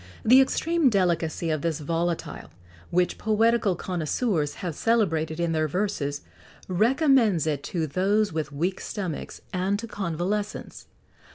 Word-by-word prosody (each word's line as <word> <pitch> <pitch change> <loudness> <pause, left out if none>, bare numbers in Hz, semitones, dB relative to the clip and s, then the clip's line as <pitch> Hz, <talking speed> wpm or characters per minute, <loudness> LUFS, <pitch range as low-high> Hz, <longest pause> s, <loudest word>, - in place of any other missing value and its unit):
The 255 +4 +8
extreme 325 +2 +2
delicacy 170 -5 0
of 155 -2 -1
this 165 -1 -1
volatile, 165 - -3 0.4
which 180 +1 +1
poetical 220 -2 +2
connoisseurs 170 - -1
have 175 -3 -4
celebrated 165 -7 +1
in 170 -1 0
their 155 -1 +1
verses,[XX 150 -5 -2 0.4
55] 185 -1 -5
recommends 245 - +4
it 150 -3 -1
to 165 -3 -2
those 195 +6 +1
with 155 -1 -3
weak 175 +7 -2
stomachs 185 -8 -5
and 190 +2 0
to 230 - -6
convalescents. 200 +1 -3
180 Hz, 130 wpm, -26 LUFS, 160-210 Hz, 0.4 s, The